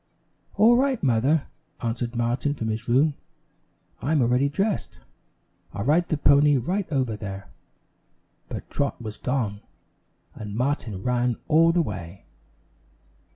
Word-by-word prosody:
"All 230 +3 +6
right, 265 -4 +1
Mother," 135 +4 +2 0.3
answered 120 +1 -3
Martin 120 +5 0
from 110 -4 -3
his 110 +2 -4
room. 140 +6 +3 0.9
"I'm 145 +5 +1
already 125 +4 +2
dressed, 195 +8 -2 0.8
I'll 100 - -4
ride 165 +5 +2
the 155 - 0
pony 145 0 +5
right 180 - -2
over 130 -6 0
there." 100 -3 -7 1.0
But - - -6
Trot 140 -3 -1
was 110 -3 -7
gone, 115 -6 -2 0.7
and 105 -1 -7
Martin 120 -6 -2
ran 125 -1 +1
all 165 +2 +5
the 170 0 +2
way. 95 - -7
125 Hz, 125 wpm, -25 LUFS, 115-150 Hz, 1.0 s, All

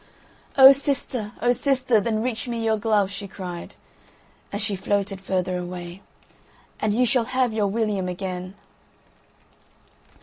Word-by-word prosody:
"O 265 0 +11
sister, 270 -6 0
O 245 - +4
sister, 255 -3 +2
then 220 +1 -1
reach 245 -1 -2
me 230 -1 -3
your 220 0 +2
glove!" 210 -2 +1
she 200 0 -6
cried, 180 -3 -8 0.8
as 205 - -3
she 210 -1 +1
floated 195 0 -2
further 185 -1 -1
away, 175 +1 -7 0.8
"and 215 - 0
you 245 +4 +2
shall 245 -1 +2
have 255 -1 0
your 210 -2 +1
William 205 -3 -1
again." 185 0 -5
210 Hz, 135 wpm, -23 LUFS, 190-235 Hz, 0.8 s, O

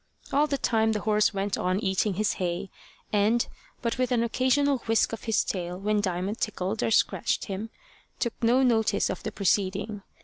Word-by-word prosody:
All 290 +2 +4
the 280 -1 -1
time 220 -3 +2
the 210 - -1
old - - -12
horse 215 -1 +3
went 200 -1 -2
on 185 +1 0
eating 195 -1 0
his 215 +2 +1
hay, 180 +2 -2 0.4
and, 215 +3 +3 0.4
but 235 +2 -1
with 255 0 +1
an 235 -2 +2
occasional 260 +3 +2
whisk 225 0 +2
of 225 - -6
his 225 -2 +2
tail 180 -2 -3
when 210 +1 +1
Diamond 190 +3 -2
tickled 210 0 -2
or - - +1
scratched 225 - +1
him, 200 +3 -5 0.5
took 235 - -1
no 245 +3 +4
notice 225 -4 +2
of - - -5
the - - -4
proceeding. 200 +1 0
215 Hz, 190 wpm, -27 LUFS, 195-235 Hz, 0.5 s, All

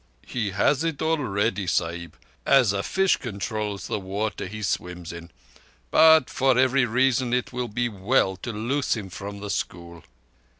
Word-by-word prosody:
"He 115 -5 -2
has 130 - +1
it 165 -4 -2
already, 110 - 0
Sahib—as 85 - 0
a 100 - -1
fish 190 - +2
controls 105 -3 -4
the - - -2
water 100 +1 -3
he 105 +3 -7
swims 90 -2 -3
in. 85 0 -9 0.6
But 160 -3 +6
for 130 -1 +2
every 130 0 +3
reason 125 +1 +1
it 125 0 -2
will 125 0 -2
be 120 +3 -1
well 100 -1 +1
to 120 - -5
loose 125 +7 -1
him 95 -4 -7
from 100 +2 -7
the 105 -1 -4
school." 85 -3 -5
110 Hz, 155 wpm, -25 LUFS, 95-130 Hz, 0.6 s, But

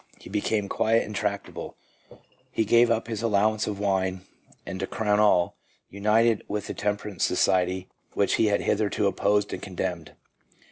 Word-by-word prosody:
He - - -13
became 105 0 0
quiet 115 +3 +2
and 105 - -7
tractable, 100 -1 -4 0.8
he 110 - 0
gave 120 +3 +5
up 115 0 0
his 110 -2 -4
allowance 110 -1 +1
of 105 - -3
wine, 95 -2 0 0.4
and 95 - -6
to 95 - -2
crown 105 -1 0
all, 95 -5 +3 0.3
united 105 +3 +2
with 105 0 -3
the - - -5
temperance 105 -1 -2
society 95 0 +1 0.3
which 100 - +2
he 110 - +4
had 100 -1 +1
hitherto 105 0 0
opposed 100 +1 +1
and - - -5
condemned. 90 -4 -4
105 Hz, 155 wpm, -26 LUFS, 95-110 Hz, 0.8 s, gave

